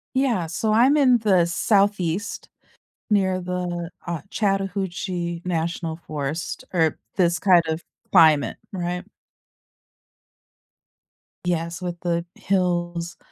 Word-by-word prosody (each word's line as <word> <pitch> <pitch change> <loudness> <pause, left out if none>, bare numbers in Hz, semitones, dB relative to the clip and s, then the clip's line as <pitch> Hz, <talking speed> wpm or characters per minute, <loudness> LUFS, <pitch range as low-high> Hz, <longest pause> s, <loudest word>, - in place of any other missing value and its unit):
Yeah, 250 -10 +2
so 195 +7 -1
I'm 250 +6 +5
in 260 -5 +5
the 190 -6 +3
southeast, 195 +1 +1 0.6
near 190 -3 +2
the, 175 -1 -3 0.2
uh, 170 -4 -3
Chattahoochee 190 -3 -2
National 165 -1 -2
Forest, 150 +2 -4
or 160 -4 +2 0.2
this 175 -2 +3
kind 180 -4 +5
of 160 +1 -2 0.3
climate, 155 - +5 0.2
right? 180 -1 -3 2.4
Yes, 170 0 -2
with 175 -1 -4
the 170 -1 -1
hills, 175 -2 -1
175 Hz, 100 wpm, -23 LUFS, 170-195 Hz, 2.4 s, I'm